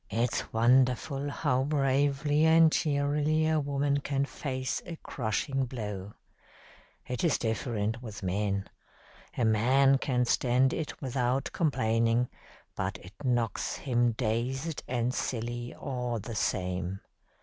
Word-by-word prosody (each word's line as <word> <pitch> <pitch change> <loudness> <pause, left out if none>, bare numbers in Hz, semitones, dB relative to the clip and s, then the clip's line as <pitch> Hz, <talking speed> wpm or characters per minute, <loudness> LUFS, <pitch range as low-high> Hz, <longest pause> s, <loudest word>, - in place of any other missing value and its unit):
"It's 115 +3 -1
wonderful 130 +4 +2
how 130 -2 0
bravely 145 +1 +2
and 160 0 +6
cheerily 150 +1 +1
a 160 -1 +2
woman 140 0 0
can 140 0 -1
face 130 -2 -3
a 170 - -5
crushing 135 +1 -2
blow. 105 -5 -6 0.9
It 125 +4 -3
is 165 -5 +3
different 110 -1 -2
with 105 -5 -8
men. 100 +1 -1 0.7
A 120 - +2
man 130 +5 +4
can 125 -2 +1
stand 125 +2 +2
it 160 - -4
without 130 +1 0
complaining, 115 -5 +1 0.5
but 95 0 -2
it 90 +2 -13
knocks 120 -3 0
him 120 -3 +1
dazed 130 +7 -2
and 125 0 0
silly 120 0 -3
all 125 -4 -3
the 110 +2 -6
same. 90 -2 -2
125 Hz, 120 wpm, -29 LUFS, 115-140 Hz, 0.9 s, and